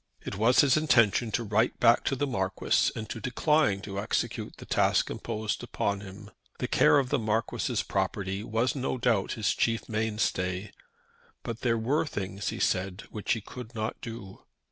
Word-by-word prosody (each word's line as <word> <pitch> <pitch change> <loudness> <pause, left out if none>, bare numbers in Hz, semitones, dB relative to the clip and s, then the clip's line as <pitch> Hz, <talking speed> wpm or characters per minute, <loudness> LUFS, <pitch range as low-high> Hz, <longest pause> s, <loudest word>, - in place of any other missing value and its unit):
It - - -4
was 115 +5 +5
his 140 0 +4
intention 120 -7 +3
to 120 - 0
write 110 +2 +1
back 120 0 +5
to 135 - +1
the 145 - 0
Marquis 95 -8 +1
and 110 - -5
to - - -4
decline 125 -3 +2
to 100 -1 -5
execute 105 - -2
the - - -10
task - - +2
imposed 110 0 -3
upon 100 0 -2
him. 100 +1 -11 0.3
The - - -2
care - - +5
of 135 -3 +1
the 145 - +1
Marquis's 110 0 -1
property 95 +1 -2
was 115 +3 0
no 130 -1 -2
doubt 115 -5 +1
his 110 -3 0
chief 115 -1 0
mainstay; 105 -3 -1 0.7
but 115 0 -5
there 115 -2 +2
were 135 +8 +1
things, 100 -4 -4
he - - -2
said, 95 +2 0
which 105 +1 -1
he 115 - -3
could 125 +2 -10
not 110 0 -3
do. 115 -5 -8
110 Hz, 175 wpm, -28 LUFS, 100-120 Hz, 0.7 s, was